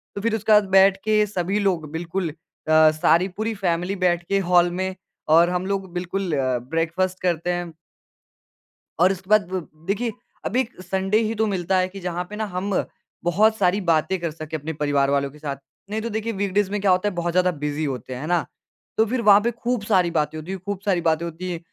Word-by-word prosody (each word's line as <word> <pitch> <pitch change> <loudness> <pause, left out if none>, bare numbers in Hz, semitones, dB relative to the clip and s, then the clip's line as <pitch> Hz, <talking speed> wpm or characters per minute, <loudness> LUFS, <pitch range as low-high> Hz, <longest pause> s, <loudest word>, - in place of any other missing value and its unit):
तो 200 - -4
फिर 225 0 +1
उसके 220 0 -1
बाद 210 -1 +6
बैठ 190 0 +6
के 215 -1 +3
सभी 195 0 -1
लोग 175 -7 0
बिल्कुल 170 +2 -3
अ, 155 0 +2
सारी 165 +3 +3
पूरी 220 +1 -1
फैमिली 180 -1 -1
बैठ 175 -2 +1
के 195 0 +2
हॉल 175 -1 +5
में 190 0 -2 0.4
और 170 +1 +6
हम 180 +1 -1
लोग 195 -1 -3
बिल्कुल 180 +1 -3
अ, 130 -2 +1
ब्रेकफास्ट 170 +4 -1
करते 175 -1 0
हैं। 175 -1 -4 1.3
और 180 +3 +5
उसके 190 0 -7
बाद 215 -4 +4
ब 185 -3 -3 0.2
देखिए 220 +4 0 0.3
अभी 255 +2 +1
संडे 190 +3 0
ही 220 +1 -1
तो 220 - +1
मिलता 190 -2 0
है 185 0 +2
कि 195 +1 -9
जहाँ 180 -1 -3
पे 210 - -7
ना 220 - -2
हम 190 +3 -2 0.5
बहुत 210 +6 +3
सारी 195 +1 +2
बातें 170 +1 +1
कर 170 -2 -3
सकें 155 0 -6
अपने 155 +2 -5
परिवार 145 -2 +1
वालों 140 0 +1
के 150 - -16
साथ। 145 -2 -4 0.3
नहीं 215 +1 -2
तो 230 - -3
देखिए 220 +1 -3
वीकडेज़ 200 0 0
में 210 - -1
क्या 195 -2 +3
होता 185 +3 +2
है 195 - -9
बहुत 175 0 -2
ज़्यादा 180 0 +3
बिज़ी 150 -1 -3
होते 130 -2 -4
हैं, 125 - -6
है 155 - -5
ना? 175 -2 +1 0.5
तो 220 - +4
फिर 245 +2 -1
वहाँ 205 -2 +7
पे 235 - 0
खूब 240 -1 -2
सारी 185 -5 +2
बातें 155 -1 -1
होती 155 +4 -7
हैं, 190 - -4
खूब 200 -1 -3
सारी 185 -4 +2
बातें 165 0 +1
होती 170 +2 -5
हैं। 170 - -4
185 Hz, 220 wpm, -23 LUFS, 165-200 Hz, 1.3 s, वहाँ